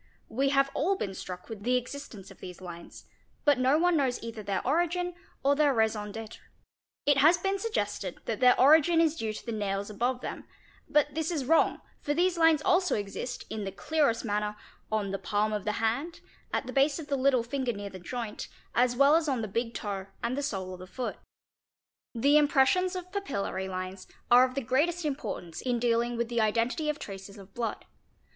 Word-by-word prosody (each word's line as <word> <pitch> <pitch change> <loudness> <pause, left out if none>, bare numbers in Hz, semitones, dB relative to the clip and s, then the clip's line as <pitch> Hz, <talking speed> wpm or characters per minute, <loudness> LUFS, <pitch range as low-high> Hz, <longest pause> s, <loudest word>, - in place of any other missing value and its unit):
We 270 +4 +1
have 275 0 +3
all 365 +8 +1
been 200 - -4
struck 180 -1 -7
with 220 -3 -8
the 250 +4 +1
existence 245 -6 -7
of 195 - -15
these 180 -2 -9
lines 175 -2 -10 0.4
but 290 -4 +4
no 260 +3 +4
one 350 +1 +3
knows 265 -5 +1
either 230 -1 -6
their 195 -2 -2
origin 350 +5 +1 0.3
or 280 +1 +4
their 290 -2 +3
raison 215 -2 0
d'étre. 225 0 -8 0.7
It 285 -1 +4
has 315 +5 +6
been 390 +2 -1
suggested 205 - -2
that 225 - -2
their 250 -1 +5
origin 315 +4 +6
is 325 -2 +3
due 225 -7 -2
to 215 - -8
the 235 - -3
nails: 200 -1 -2
above 245 +4 -1
them - - -6 0.4
but 295 -1 +3
this 320 +1 -1
is 305 -7 -2
wrong, 320 +4 +3 0.2
for 290 - -2
these 360 +2 +2
lines 325 -2 +4
also 360 -3 +3
exist, 205 +4 -4
in 215 -1 -3
the 195 - -4
clearest 280 -3 0
manner, 210 0 -1 0.4
on 210 -3 0
the 195 - -3
palm 215 0 0
of 210 -1 -3
the 210 - 0
hand, 235 +11 -1 0.3
at - - -1
the 255 - -6
base 280 +1 +3
of 320 - -6
the 285 - 0
little 260 -2 +3
finger 255 +1 -2
near 200 -2 -6
the 185 - -9
joint, 230 +3 -5 0.3
as 245 0 +3
well 280 +4 +6
as 325 -2 +2
on 255 -4 0
the - - -2
big 230 +3 -2
toe 195 -2 -4 0.2
and 235 +2 0
the 285 - -2
sole 190 -9 -3
of 180 - -9
the 185 - -9
foot. 240 +7 -4 1.0
The 280 +6 +5
impressions 300 +6 +3
of 365 0 -6
papillary 200 - -3
lines 185 0 -5 0.2
are 250 +1 +8
of 255 0 -6
the 275 - 0
greatest 310 +8 +1
importance 225 - -4
in 250 -2 0
dealing 235 0 +1
with 235 0 0
the 235 -1 0
identity 230 +8 +1
of 300 - -1
traces 195 -2 -9
of 195 0 -14
blood. 230 -3 -3
245 Hz, 205 wpm, -29 LUFS, 210-295 Hz, 1.0 s, are